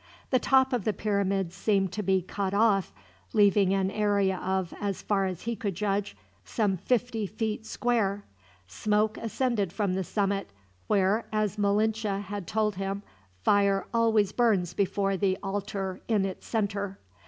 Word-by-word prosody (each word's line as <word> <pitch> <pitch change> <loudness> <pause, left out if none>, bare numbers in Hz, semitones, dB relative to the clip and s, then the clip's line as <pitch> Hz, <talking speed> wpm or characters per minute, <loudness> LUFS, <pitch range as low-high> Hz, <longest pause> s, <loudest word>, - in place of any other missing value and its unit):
The 255 - +4
top 265 0 +3
of 240 -5 0
the 215 - 0
pyramid 195 -3 0
seemed 195 0 +1
to 210 - -3
be 190 -2 +1
cut 195 +1 -3
off, 205 -3 +3 0.4
leaving 200 -2 +4
an 195 -1 +1
area 200 -3 +1
of, 190 -2 -1
as 200 -2 -2
far 195 -2 +1
as 185 -2 -5
he 235 0 -2
could 200 -3 -3
judge, 205 +1 -1 0.3
some 210 -5 0
fifty 225 +2 -1
feet 220 +1 -3
square. 205 -5 0 0.4
Smoke 210 - 0
ascended 225 -4 -1
from 200 -1 -1
the 190 0 -1
summit, 200 +2 -1 0.4
where, 200 +3 +2
as 210 -1 -1
Malinche 210 0 +1
had 200 -1 -6
told 210 -3 0
him, 195 +1 -3 0.4
fire 200 - +3
always 225 -4 +3
burns 205 -7 +2
before 195 0 0
the 190 -1 +1
altar 195 -1 -3
in 210 -4 +2
its 190 -1 -6
center. 200 -3 -2
200 Hz, 155 wpm, -28 LUFS, 195-215 Hz, 0.4 s, The